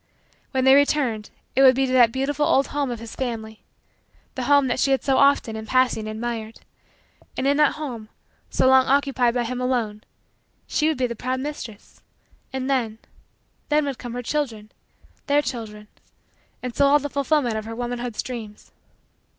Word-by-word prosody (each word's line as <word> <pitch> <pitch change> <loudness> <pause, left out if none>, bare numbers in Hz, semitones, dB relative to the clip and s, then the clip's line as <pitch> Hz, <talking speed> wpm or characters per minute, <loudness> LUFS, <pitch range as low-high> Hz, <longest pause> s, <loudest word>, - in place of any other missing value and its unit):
When 260 -1 0
they 265 0 +7
returned, 275 -6 +2 0.3
it 265 - +4
would 260 -1 +7
be 270 +1 +2
to 255 - -3
that 240 -3 +6
beautiful 275 +4 -1
old 275 - +3
home 285 -2 -1
of 240 - -3
his 230 0 -9
family 220 -4 -5 0.7
the 255 - -4
home 285 0 +5
that 260 - -1
she 275 - +2
had 270 -1 +1
so 270 -2 +2
often, 280 -5 +3
in 220 0 -7
passing, 255 -4 +1
admired; 220 0 -5 0.8
and 260 - -1
in 280 +1 +3
that 300 -2 +4
home, 245 -8 -6 0.4
so - - +2
long 260 0 +5
occupied 270 -3 +2
by 245 - +1
him 250 +2 -4
alone, 230 -5 -1 0.6
she 305 - 0
would 315 - 0
be 255 - +1
the 235 -1 -4
proud 255 +3 -2
mistress. 260 -7 -8 0.5
And 265 -1 -3
then 240 -5 0 0.7
then 300 0 +2
would 275 -3 -4
come 245 -2 -7
her 245 0 -4
children 230 -7 -3 0.6
their 290 +1 +3
children 215 -5 -6 0.8
and 250 -2 -5
so 280 - +4
all 285 +1 +6
the 290 0 -3
fulfillment 280 -4 0
of 215 0 -4
her 225 0 -6
womanhood's 245 -1 -4
dreams. 220 -4 -8
255 Hz, 180 wpm, -23 LUFS, 230-275 Hz, 0.8 s, they